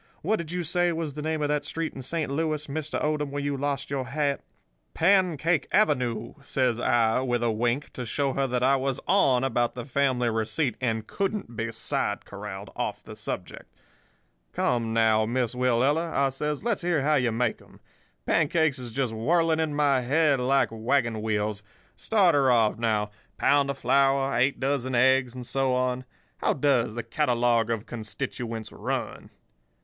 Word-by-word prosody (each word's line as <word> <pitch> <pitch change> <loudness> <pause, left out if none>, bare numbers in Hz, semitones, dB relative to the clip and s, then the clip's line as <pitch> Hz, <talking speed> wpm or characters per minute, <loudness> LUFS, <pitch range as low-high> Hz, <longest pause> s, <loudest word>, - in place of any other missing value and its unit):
What 215 +7 +1
did 170 -1 -6
you 180 0 -2
say 175 +2 +1
was 160 -3 -3
the 150 - -6
name 155 0 -1
of 145 - 0
that 150 -1 0
street 165 +2 -3
in 135 - -7
Saint 150 +2 -2
Louis, 155 0 -1
Mr. 155 +1 -3
Odom, 150 -1 0
where 145 0 -4
you 145 0 -1
lost 140 0 -3
your 135 -2 -1
hat?' 140 +1 -1 0.5
"'Pancake 170 -4 +2
Avenue,' 125 - +1
says 130 -4 0
I, 115 -1 +2
with 120 -2 -1
a 115 - +2
wink, 120 +6 -1
to 125 - -5
show 135 +4 -1
her 135 0 0
that 125 0 -1
I 135 +1 +4
was 135 0 -2
on 135 -10 +3
about 120 -2 0
the 120 -2 -6
family 130 -2 +1
receipt, 115 +3 -1
and 110 -3 -1
couldn't 195 - -3
be 115 +1 -3
side - - -2
corralled 100 0 -8
off - - -3
of - - -34
the - - -10
subject. - - -7 0.7
'Come, 115 -2 0
now, 110 -1 +3
Miss 120 0 -1
Willella,' 130 +7 +1
I 140 0 +2
says; 150 +4 -3
'let's 230 -3 0
hear 170 -5 +1
how 155 +2 +2
you 125 -5 +2
make 115 0 -1
'em. - - -19 0.5
Pancakes 160 -3 +2
is 125 -1 -6
just 125 -1 -2
whirling 160 +8 +2
in 155 -2 -1
my 140 -3 +3
head 145 +2 +2
like 135 +2 +2
wagon 115 0 0
wheels. 105 -1 -1 0.3
Start 195 -6 +3
her 140 -2 +3
off, 115 -3 +3
now—pound 115 +6 0
of 140 - -2
flour, 135 +1 +2
eight 130 +4 +2
dozen 130 -2 -1
eggs, 130 0 +3
and 125 -1 -7
so 135 0 0
on. 125 0 -1 0.3
How - - +1
does 130 -6 +1
the 120 - -3
catalogue 120 -2 +1
of 115 -2 -2
constituents 115 0 -5
run? - - -4
130 Hz, 175 wpm, -26 LUFS, 120-150 Hz, 0.7 s, I